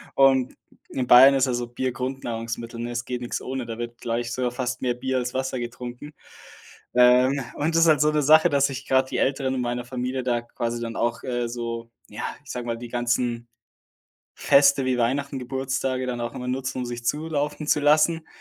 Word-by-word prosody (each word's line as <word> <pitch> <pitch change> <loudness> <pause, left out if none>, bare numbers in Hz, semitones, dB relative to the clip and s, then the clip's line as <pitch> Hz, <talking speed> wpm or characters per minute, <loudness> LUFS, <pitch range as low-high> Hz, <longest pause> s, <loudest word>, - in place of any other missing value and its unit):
und 135 -2 +4 0.3
in 125 -1 -3
Bayern 135 +3 +8
ist 135 0 +3
ja 125 - -1
so 120 0 -2
Bier 130 +1 -2
Grundnahrungsmittel, 115 -2 -5
ne? 120 +1 -4
Es 120 +1 -3
geht 125 -1 -4
nix 120 - -4
ohne, 130 -1 -4
da 115 -1 -6
wird 120 0 -6
gleich 120 0 -2
sogar 125 -1 -1
fast 125 0 -3
mehr 125 -1 +1
Bier 130 +1 -2
als 125 0 -2
Wasser 130 -1 -2
getrunken. 125 +4 -7 0.8
Ähm, 125 +2 +5
und 160 +3 -1
das 165 - +5
ist 165 - +5
halt 155 -1 +4
so 150 0 +4
‘ne 150 -1 +1
Sache, 155 +2 +6
dass 140 -1 +2
ich 135 0 -7
gerade 130 0 +2
die - - -3
Älteren 135 -1 0
in 125 - -1
meiner 120 0 -2
Familie 125 +1 -3
da 120 -2 0
quasi 120 0 -4
dann 115 -1 -5
auch, 120 0 -1
äh, 120 -2 -2
so, 115 -1 -5 0.2
ja, 105 - -7 0.2
ich - - -8
sage 125 -1 -5
mal, 115 0 -2
die 120 0 -8
ganzen 120 0 -1 0.9
Feste 140 -1 +4
wie 130 -1 +1
Weihnachten, 135 +3 0
Geburtstage 130 0 -2
dann 120 -1 -3
auch 120 0 -4
immer 125 0 -5
nutzen, 130 +1 -3
um 125 - -3
sich 120 0 -6
zulaufen 150 +1 -2
zu - - +4
lassen 155 +2 +3
125 Hz, 210 wpm, -24 LUFS, 120-135 Hz, 0.9 s, Bayern